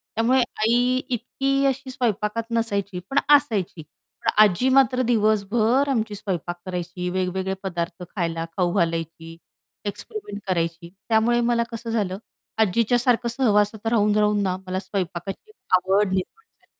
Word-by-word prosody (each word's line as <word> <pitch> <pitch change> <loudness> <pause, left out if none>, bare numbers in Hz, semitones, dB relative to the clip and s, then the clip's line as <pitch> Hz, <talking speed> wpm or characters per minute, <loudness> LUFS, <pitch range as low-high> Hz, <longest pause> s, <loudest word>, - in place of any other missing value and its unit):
त्यामुळे 245 +4 +3 0.2
आई 245 +3 +3
इतकी 270 +3 0
अशी 270 0 -1
स्वयंपाकात 230 -3 -1
नसायची, 200 -5 -1
पण 280 - +3 0.2
असायची. 210 - 0 0.4
पण - - +1
आजी 215 +6 +2
मात्र 260 -1 +4
दिवसभर 225 +3 +2
आमची 220 -5 -1
स्वयंपाक 175 -4 -4
करायची, 180 0 -4
वेगवेगळे 185 +1 -1
पदार्थ 175 -1 -4
खायला 165 -3 -2
खाऊ 175 -2 +1
घालायची 165 0 -2 0.5
एक्सपेरिमेंट 205 - -6
करायची 170 -1 -2 0.2
त्यामुळे 230 +2 +3
मला 235 0 +2
कसं 230 0 -6
झालं 200 -5 -1 0.4
आजीच्यासारखं 235 +4 +2
सहवासात 220 -3 +1
राहून-राहून 210 -1 +3
ना 185 -2 0
मला 185 0 -2
स्वयंपाकाची 190 - -5 0.3
आवड 195 +3 +2
निर्माण 430 - -4
झाली. - - -37
210 Hz, 125 wpm, -23 LUFS, 185-240 Hz, 0.5 s, मात्र